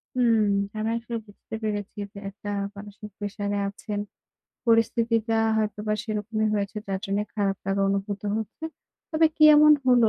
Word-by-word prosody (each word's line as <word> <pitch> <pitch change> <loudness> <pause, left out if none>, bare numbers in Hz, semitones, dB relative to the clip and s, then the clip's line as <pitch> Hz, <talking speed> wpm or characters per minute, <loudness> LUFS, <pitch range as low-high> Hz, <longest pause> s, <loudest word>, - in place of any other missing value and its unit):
হুম, 235 -3 +4 0.4
আমি 215 +1 -1
আসলে 235 0 -5
বুঝতে 205 +2 -9
পেরেছি 205 -2 -3 0.2
যে 200 - -11
একটা 205 +1 -8 0.3
মানসিক 205 +1 -9
প্রেশারে 205 0 -2
আছেন। 205 +1 -5 0.7
পরিস্থিতিটা 230 0 +2 0.2
হয়তোবা 215 0 -1
সেরকমই 215 0 -1
হয়েছে 200 +1 -2
যার 195 -1 -2
জন্যে 200 +1 0
খারাপ 200 -2 +1
লাগা 195 0 +1
অনুভূত 200 0 -1 0.2
হচ্ছে। 220 +7 -5 0.5
তবে 320 -1 +4
কি 310 - +6
এমন 300 0 +8
হলো 245 -3 +6
215 Hz, 145 wpm, -26 LUFS, 205-230 Hz, 0.7 s, এমন